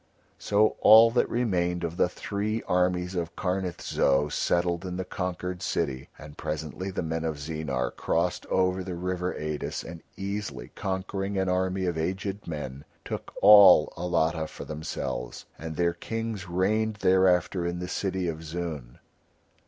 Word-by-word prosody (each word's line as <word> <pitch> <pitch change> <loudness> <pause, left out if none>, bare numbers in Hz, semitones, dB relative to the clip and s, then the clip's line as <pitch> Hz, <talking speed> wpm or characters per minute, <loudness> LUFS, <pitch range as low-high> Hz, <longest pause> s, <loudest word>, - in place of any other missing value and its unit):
So 105 +1 +2
all 115 +1 +8
that 120 - +2
remained 90 -7 0
of 85 0 -3
the 90 - +2
three 105 +4 -3
armies 90 0 +1
of 85 -2 -3
Karnith 90 -2 -2
Zo 70 +2 +2
settled 85 +3 0
in 90 -1 -4
the 95 - -3
conquered 90 -1 -4
city. 70 -8 -2
And 75 -1 -12
presently 80 +5 -4
the 95 - -3
men 80 0 -2
of 80 -2 -2
Zeenar 70 -4 -3
crossed - - -1
over 95 0 +1
the 90 -1 -5
river 90 +1 -2
Eidis 75 -1 -4
and 85 0 -9 0.2
easily 100 +1 -5
conquering 95 +1 -3
an 95 -1 +1
army 95 +1 0
of 85 -3 -1
aged 95 +4 -3
men 70 -4 -5 0.2
took - - -5
all 100 -6 +8
Alatta 80 -2 0
for - - -9
themselves, 75 -5 -5
and 80 0 -6
their 85 +1 +1
kings 110 0 -5
reigned 105 +5 +1
thereafter 90 -1 +3
in 85 0 -2
the 90 0 -4
city 95 -1 -2
of 80 -1 -4
Zoon. 80 -6 -5
90 Hz, 150 wpm, -27 LUFS, 80-95 Hz, 0.2 s, all